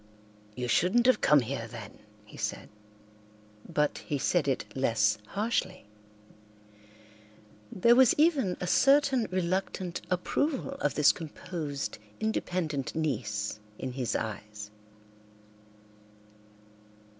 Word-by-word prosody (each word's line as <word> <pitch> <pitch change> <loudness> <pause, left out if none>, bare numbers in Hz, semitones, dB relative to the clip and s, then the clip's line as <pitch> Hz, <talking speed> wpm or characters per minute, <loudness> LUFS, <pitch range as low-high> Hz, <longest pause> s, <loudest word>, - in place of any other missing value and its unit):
"You 125 -1 -3
shouldn't 185 - +3
have 255 - +4
come 150 -2 +5
here, 120 -1 -4
then," 110 -2 -10 0.3
he 105 - -15
said, - - -4 1.0
but 150 -3 0
he 145 - -3
said 155 +3 +1
it 135 - 0
less 110 -5 +2
harshly. 195 - -2 1.9
There 235 +6 +4
was 260 -2 +6
even 290 - +3
a - - -3
certain 270 +3 +4
reluctant 185 0 -2
approval 270 - -1
of - - 0
this 150 -1 +6
composed, 155 - -5 0.2
independent 175 - -2
niece 105 -10 -2 0.2
in 130 - -4
his 125 -2 -2
eyes. 105 -1 -5
160 Hz, 100 wpm, -29 LUFS, 125-195 Hz, 1.9 s, was